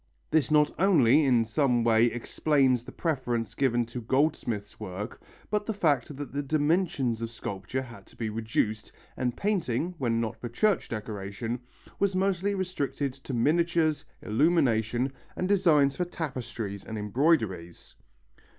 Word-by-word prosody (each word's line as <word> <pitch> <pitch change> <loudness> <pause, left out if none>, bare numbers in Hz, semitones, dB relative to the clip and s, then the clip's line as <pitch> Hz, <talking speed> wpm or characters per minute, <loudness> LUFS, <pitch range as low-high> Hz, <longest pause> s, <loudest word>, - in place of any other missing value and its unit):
This 155 -1 +3
not 150 -1 +4
only 155 - +5
in 120 -4 +3
some 120 0 +2
way 115 0 +5
explains 130 +2 +1
the - - -10
preference 120 - -2
given 120 -2 +1
to 120 +2 -6
goldsmiths' 120 -5 -1
work 105 +2 -6 0.3
but 210 -1 0
the 220 - -1
fact 145 -6 +1
that 140 -3 -6
the 145 - -1
dimensions 145 -5 +1
of 115 - -3
sculpture 110 +2 -4
had 120 -2 -12
to - - -19
be 115 - -3
reduced, 110 -1 -2 0.2
and 125 -2 -2
painting, 180 - 0
when 115 -3 +1
not 115 -1 -2
for 120 - -4
church 195 - +1
decoration, 110 +2 -4 0.4
was 200 -1 +1
mostly 195 +1 +1
restricted 145 -7 -2
to 135 -1 -6
miniatures, 160 +4 +2 0.2
illumination, 125 -2 +2 0.2
and 185 - -1
designs 150 -8 +4
for 180 - -1
tapestries 120 - -5
and 110 - -6
embroideries. 105 - 0
130 Hz, 140 wpm, -28 LUFS, 115-155 Hz, 0.4 s, only